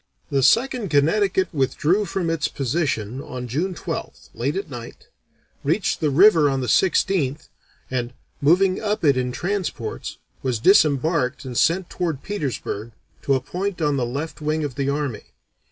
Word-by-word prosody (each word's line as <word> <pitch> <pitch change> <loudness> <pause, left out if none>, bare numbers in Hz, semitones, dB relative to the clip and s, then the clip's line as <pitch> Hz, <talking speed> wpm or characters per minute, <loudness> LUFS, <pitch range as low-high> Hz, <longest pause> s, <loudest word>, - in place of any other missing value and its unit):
The 140 -1 +2
Second 230 - +3
Connecticut 185 +7 +2
withdrew 150 +8 +1
from 180 -4 -2
its 165 -3 0
position 130 -4 -2
on 125 -2 -6
June 170 +10 -2
12th, - - -6
late 135 +5 -2
at 195 -1 -3
night, 120 -5 -10 0.5
reached 160 +8 0
the 155 - +1
river 165 0 +6
on 135 -1 0
the 130 - -2
16th, 150 - +1 0.4
and, 125 -2 -2 0.3
moving 185 +6 +4
up 210 -3 -1
it 140 -2 +5
in 125 -1 -1
transports, 165 - -3 0.2
was 130 -3 -1
disembarked 150 - +3
and 125 -2 -6
sent 170 +7 +2
toward 165 -6 -3
Petersburg, 125 - -4 0.3
to 140 - +2
a - - +1
point 185 +7 -4
on 150 -3 +1
the 130 - 0
left 145 +6 -5
wing 155 +1 0
of 145 -3 -3
the 140 +2 -1
army. 140 -5 -2
150 Hz, 155 wpm, -22 LUFS, 130-180 Hz, 0.5 s, river